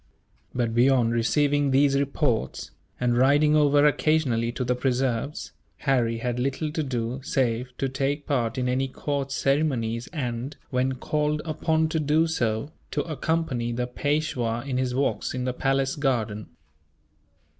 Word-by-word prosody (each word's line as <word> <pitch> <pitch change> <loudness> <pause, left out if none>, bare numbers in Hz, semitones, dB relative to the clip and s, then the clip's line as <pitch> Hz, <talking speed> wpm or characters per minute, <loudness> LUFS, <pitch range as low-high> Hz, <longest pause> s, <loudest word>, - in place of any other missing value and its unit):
But 120 -2 0
beyond 120 -1 +3
receiving 145 +4 +2
these 135 +1 +4
reports, 140 -3 -1 0.3
and 120 -1 +1
riding 145 +4 +4
over 145 -1 +4
occasionally 145 -6 +2
to 130 - -2
the 125 0 +1
preserves, 130 +1 -1 0.3
Harry 120 -4 +1
had 120 +1 -2
little 135 +4 -1
to 155 - -2
do 125 -2 -3
save 125 -1 -1
to 135 - 0
take 135 +2 -2
part 125 -3 0
in 125 -1 0
any 130 +2 +1
court 140 +1 -3
ceremonies 135 -5 0
and, 130 -3 -4
when 130 0 +1
called 150 +3 -1
upon 160 0 +1
to 160 - 0
do 155 +2 +3
so, 120 -4 -1 0.2
to - - -1
accompany 155 -7 -1
the 125 +1 -1
Peishwa 125 -3 -1
in 130 -2 -1
his 125 -1 -1
walks 135 -1 -1
in 125 - -2
the 125 0 -1
palace 135 0 0
garden. 115 -7 -1
135 Hz, 145 wpm, -25 LUFS, 120-145 Hz, 0.3 s, these